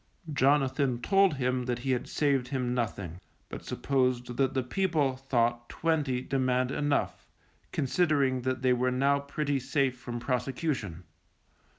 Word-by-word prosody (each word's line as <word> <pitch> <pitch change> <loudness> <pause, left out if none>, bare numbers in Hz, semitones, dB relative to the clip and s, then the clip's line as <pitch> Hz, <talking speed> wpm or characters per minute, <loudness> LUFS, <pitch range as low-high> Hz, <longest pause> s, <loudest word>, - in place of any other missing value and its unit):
Jonathan 135 -2 +2
told 195 +2 +3
him 125 -1 -1
that 120 -1 -1
he 130 +2 -2
had 125 -1 -1
saved 140 -4 +1
him 125 -2 -1
nothing, 100 -7 -3 0.3
but - - -7
supposed 125 -3 -1
that 135 0 +1
the 130 - +1
people 150 -2 0
thought 120 -2 0
twenty 150 -6 0
demand 130 -1 0
enough, 145 0 -1 0.4
considering 140 -3 +1
that 130 0 -2
they 130 -1 +4
were 125 +1 +1
now 140 +3 +2
pretty 140 0 -2
safe 135 0 0
from 120 -1 -6
prosecution. 125 - -2
130 Hz, 135 wpm, -29 LUFS, 125-140 Hz, 0.4 s, they